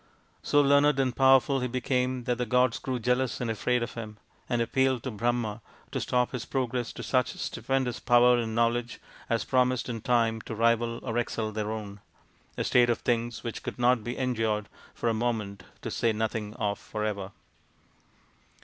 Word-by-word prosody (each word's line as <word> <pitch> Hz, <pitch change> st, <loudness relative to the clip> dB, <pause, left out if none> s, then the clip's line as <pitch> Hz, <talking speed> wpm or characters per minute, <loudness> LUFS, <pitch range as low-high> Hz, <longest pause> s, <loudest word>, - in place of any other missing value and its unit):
So 145 Hz, -, +3 dB
learned 140 Hz, 0 st, +4 dB
and 130 Hz, -2 st, +1 dB
powerful 135 Hz, +1 st, +5 dB
he 125 Hz, -, -1 dB
became 125 Hz, 0 st, -1 dB
that 125 Hz, 0 st, -1 dB
the 125 Hz, -, 0 dB
gods 125 Hz, +1 st, +2 dB
grew 130 Hz, -1 st, -3 dB
jealous 125 Hz, +1 st, 0 dB
and 120 Hz, -2 st, -1 dB
afraid 125 Hz, +2 st, 0 dB
of -, -, -5 dB
him, 110 Hz, -2 st, -7 dB, 0.3 s
and 120 Hz, -2 st, +1 dB
appealed 130 Hz, +1 st, +1 dB
to 130 Hz, -, -3 dB
Brahma 115 Hz, 0 st, -1 dB, 0.3 s
to -, -, -2 dB
stop 125 Hz, -1 st, +1 dB
his 125 Hz, -3 st, -4 dB
progress 125 Hz, -3 st, -2 dB
to -, -, -7 dB
such 130 Hz, -1 st, +1 dB
stupendous 130 Hz, -3 st, -2 dB
power 120 Hz, 0 st, +5 dB
and 110 Hz, -1 st, -3 dB
know 115 Hz, 0 st, +4 dB
ledge 120 Hz, +1 st, -3 dB, 0.3 s
as 115 Hz, -1 st, +1 dB
promised 125 Hz, -1 st, +1 dB
in 115 Hz, -2 st, -4 dB
time 115 Hz, -2 st, +1 dB
to 115 Hz, -, -6 dB
rival 115 Hz, +1 st, +1 dB
or 120 Hz, -1 st, -1 dB
excel 110 Hz, -2 st, -2 dB
their 105 Hz, 0 st, -3 dB
own 105 Hz, -2 st, -6 dB, 0.6 s
a -, -, 0 dB
state 120 Hz, -1 st, +4 dB
of 120 Hz, -, +2 dB
things 120 Hz, 0 st, -1 dB
which 115 Hz, -, -5 dB
could -, -, -6 dB
not 120 Hz, -2 st, +3 dB
be 120 Hz, +2 st, -4 dB
endured 110 Hz, -5 st, -1 dB, 0.3 s
for -, -, -2 dB
a 115 Hz, -, +3 dB
moment, 110 Hz, -4 st, -2 dB, 0.2 s
to -, -, -4 dB
say 115 Hz, -1 st, +1 dB
nothing 110 Hz, 0 st, -3 dB
of 105 Hz, -4 st, -2 dB
for 105 Hz, -1 st, -4 dB
ever. 100 Hz, -2 st, -3 dB
120 Hz, 185 wpm, -28 LUFS, 110-125 Hz, 0.6 s, powerful